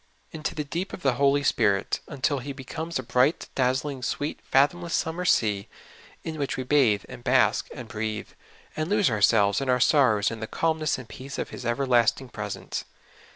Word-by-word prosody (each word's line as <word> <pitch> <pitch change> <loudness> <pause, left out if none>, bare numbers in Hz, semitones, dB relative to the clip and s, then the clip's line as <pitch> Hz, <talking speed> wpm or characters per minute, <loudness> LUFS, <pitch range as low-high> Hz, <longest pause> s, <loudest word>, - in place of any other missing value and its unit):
Into 155 -1 -4
the 150 - -2
deep 170 +6 -4
of 180 - -8
the 135 -2 +3
Holy 140 0 +4
Spirit, 100 -7 +1
un 145 -4 -9
til 140 +2 +2
He 140 +3 -6
becomes 160 +5 -5
a 130 - -4
bright, 125 +5 +1
dazzling, 130 +1 0
sweet, 145 +4 -3
fathomless 165 +5 +2
summer 170 +3 -2
sea, 105 - +2 0.6
in 160 -1 -5
which 140 - -2
we 130 - -2
bathe 125 -7 +3
and 120 - -10
bask 125 0 +3
and 125 -5 -8
breathe, 110 -2 -4 0.5
and 155 +2 -2
lose 205 - +3
ourselves 105 0 +3
and 135 - -2
our 125 0 +3
sorrows 125 -7 +4
in 115 - -6
the 110 - -5
calmness 160 0 0
and 130 -3 -9
peace 130 +5 -8
of - - -4
His - - -6
everlasting 120 0 +2
presence. 105 -3 -5
130 Hz, 185 wpm, -26 LUFS, 115-150 Hz, 0.6 s, Holy